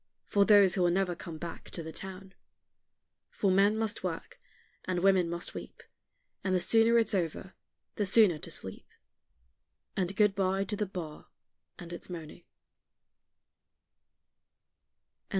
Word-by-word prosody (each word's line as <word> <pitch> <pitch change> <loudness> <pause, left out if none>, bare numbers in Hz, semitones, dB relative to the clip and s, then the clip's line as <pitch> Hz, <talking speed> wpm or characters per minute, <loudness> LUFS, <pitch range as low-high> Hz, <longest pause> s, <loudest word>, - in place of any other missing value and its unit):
For 200 -1 +3
those 200 -3 +6
who 185 - 0
will 175 - +4
never 180 0 +1
come 170 -1 -8
back 170 +1 -8
to 170 - -6
the 160 - -7
town; 190 +2 -9 1.0
For 195 - 0
men 200 +3 +4
must 220 0 -2
work, - - -5 0.4
and 185 -1 -1
women 190 -3 +4
must 170 0 -5
weep, - - -9 0.6
And 185 -1 +1
the - - +3
sooner 225 +5 +4
it's 230 -1 +2
over, 185 0 -2 0.4
the 205 - 0
sooner 195 -5 +5
to 165 - -7
sleep, 95 - -7 1.1
And 190 0 -1
good 210 -1 +4
bye 195 0 0
to 210 +2 -3
the 210 0 -2
bar 170 -5 -7 0.5
and 175 0 -9
its 175 - -9
moaning. 170 -1 -9
190 Hz, 140 wpm, -30 LUFS, 175-200 Hz, 1.1 s, those